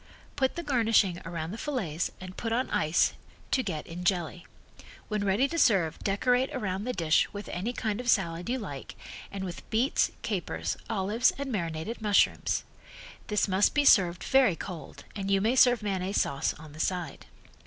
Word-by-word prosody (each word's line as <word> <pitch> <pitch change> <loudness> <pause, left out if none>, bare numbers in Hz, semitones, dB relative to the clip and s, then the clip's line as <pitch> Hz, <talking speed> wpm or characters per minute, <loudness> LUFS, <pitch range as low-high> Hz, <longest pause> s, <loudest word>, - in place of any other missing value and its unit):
Put 265 -2 +1
the 345 - -4
garnishing 225 - +2
around 165 -1 -4
the 220 - -7
fillets 195 - -2
and 185 0 -9
put 225 - -3
on 250 +3 0
ice 155 +3 +2 0.4
to 260 - +3
get 170 -10 -4
in 175 +2 -7
jelly. 175 -2 -1 0.6
When 210 -1 -1
ready 205 +7 +2
to 335 - -2
serve 185 - +3
decorate 245 +6 +1
around 200 -4 -2
the 250 - -1
dish 160 -4 +2
with 205 0 -7
any 195 +7 -2
kind 220 -2 -2
of 245 - -3
salad 175 -3 +1
you 255 - 0
like, 145 - -7 0.4
and 195 -1 -5
with 180 -2 -7
beets, 235 +6 +2
capers, - - -2
olives 215 +2 +2
and 280 -1 -4
marinated 170 +2 -3
mushrooms. 210 -2 +2 0.6
This 210 -1 +1
must 195 +1 +2
be 290 -1 +3
served 180 -8 +5
very 265 -9 +4
cold 175 -2 -8
and 195 -2 -3
you 195 0 +4
may 225 +6 +1
serve 245 -3 +5
mayonnaise 195 -1 -1
sauce 140 0 -1
on 155 -1 -12
the 155 - -12
side. 175 -4 -3
200 Hz, 175 wpm, -28 LUFS, 175-240 Hz, 0.6 s, served